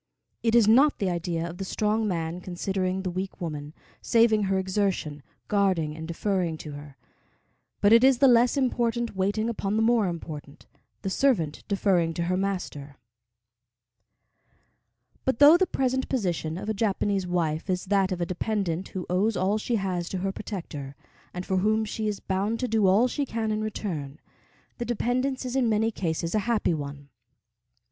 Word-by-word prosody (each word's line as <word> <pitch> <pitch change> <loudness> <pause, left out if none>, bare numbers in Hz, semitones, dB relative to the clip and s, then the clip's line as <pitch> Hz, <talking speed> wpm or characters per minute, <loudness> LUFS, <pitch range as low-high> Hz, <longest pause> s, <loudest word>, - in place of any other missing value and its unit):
It 230 0 +2
is 230 -3 +6
not 270 +7 +5
the 195 -3 0
idea 170 -1 -2
of 175 +2 -9
the - - -2
strong 215 +3 0
man 170 -1 -2
considering 185 +1 -2
the 185 - -2
weak 190 +2 -5
woman, 150 -4 -5 0.3
saving 225 -3 +3
her 190 0 +1
exertion, 190 -6 -1 0.3
guarding 185 -7 +1
and 160 0 -7
deferring 175 -1 -1
to 150 - -6
her; 145 -1 -10 0.8
but 205 +2 +6
it 230 +2 +7
is 265 -1 +6
the 275 - +5
less 245 +2 +4
important 240 -3 0
waiting 205 +4 0
upon 210 -3 -2
the 220 - +2
more 225 -3 +3
important, 155 -3 -7 0.4
the 195 - -2
servant 190 - +1
deferring 185 -5 +1
to 170 - -1
her 180 +2 0
master. 180 -7 -3 2.3
But 260 -3 0
though 290 +5 +9
the 370 +1 +3
present 260 -3 -1
position 175 - -1
of 195 - -6
a 220 - 0
Japanese 200 -2 0
wife 165 -1 -1
is 180 -1 -1
that 195 -1 +2
of 180 - -2
a 175 - 0
dependent 185 -1 -2
who 185 -2 -6
owes 195 +3 +1
all 200 +4 +1
she 235 +2 -1
has 185 -4 -2
to 190 - -3
her 195 - 0
protector, 165 -10 -7 0.4
and 180 +1 -6
for 190 - 0
whom 215 +3 +2
she 215 +1 -3
is 210 -2 -2
bound 200 +4 -1
to 250 - 0
do 220 -4 +2
all 205 +7 +5
she 285 +3 -2
can 225 -4 -2
in 215 0 -1
return, 170 -10 -4 0.6
the - - -1
dependence 250 +3 -1
is 250 0 -4
in 255 -3 +2
many 220 +1 +2
cases 165 -4 -2
a 215 - +3
happy 220 -6 +2
one. 140 -2 -6
195 Hz, 175 wpm, -26 LUFS, 175-225 Hz, 2.3 s, though